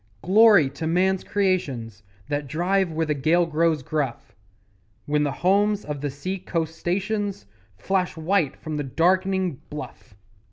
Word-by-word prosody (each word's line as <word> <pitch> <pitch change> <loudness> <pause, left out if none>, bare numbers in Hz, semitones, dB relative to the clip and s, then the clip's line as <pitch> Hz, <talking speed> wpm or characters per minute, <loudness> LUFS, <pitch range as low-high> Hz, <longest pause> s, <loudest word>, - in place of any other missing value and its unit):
Glory 205 -4 +6
to 160 +4 -5
man's 185 +3 +1
creations 140 - -1 0.3
That 145 0 -2
drive 180 +4 0
where 160 +1 -1
the 150 - 0
gale 160 +5 +2
grows 160 -2 +1
gruff, 140 -4 -3 0.7
When 150 0 +1
the 145 -1 0
homes 205 +5 +1
of 150 -2 -5
the 145 - -2
sea 185 +8 -5
coast 165 -3 -3
stations 200 - -2 0.3
Flash 185 - -1
white 160 -2 0
from 155 -1 -5
the 145 - -2
dark'ning 185 +3 +1
bluff! 145 -6 -9
165 Hz, 145 wpm, -24 LUFS, 150-190 Hz, 0.7 s, Glory